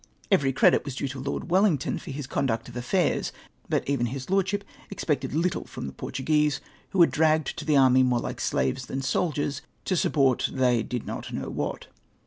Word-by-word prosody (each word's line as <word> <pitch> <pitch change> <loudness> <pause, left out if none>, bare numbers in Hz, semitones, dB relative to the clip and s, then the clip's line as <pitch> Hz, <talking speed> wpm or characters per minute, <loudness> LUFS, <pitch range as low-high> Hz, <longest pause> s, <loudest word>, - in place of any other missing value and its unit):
Every 140 -9 +4
credit 130 - +4
was 140 -3 -6
due 140 - -2
to 135 0 -6
Lord 140 +5 -4
Wellington 185 -7 +2
for - - -10
his 140 0 -4
conduct 125 -4 -1
of 120 - -10
afiairs, 125 +10 0 0.4
but - - 0
even 135 -4 +1
his 130 +7 -6
lordship 195 +1 +1 0.3
expected 145 -8 -2
little 170 +3 0
from - - -7
the 70 - -6
Portuguese, 150 - 0 0.3
who - - -4
were 170 - +8
dragged 155 -2 +2
to 150 - -6
the 150 -2 +3
army 130 -1 +6
more 125 -1 +3
like - - -5
slaves 65 0 0
than 135 0 -3
soldiers, 145 -1 -1 0.2
to 185 - +1
support, 135 -6 +2
they 125 -3 +2
did 120 +1 -4
not - - -6
know - - -4
what. - - -3
140 Hz, 190 wpm, -26 LUFS, 130-160 Hz, 0.4 s, were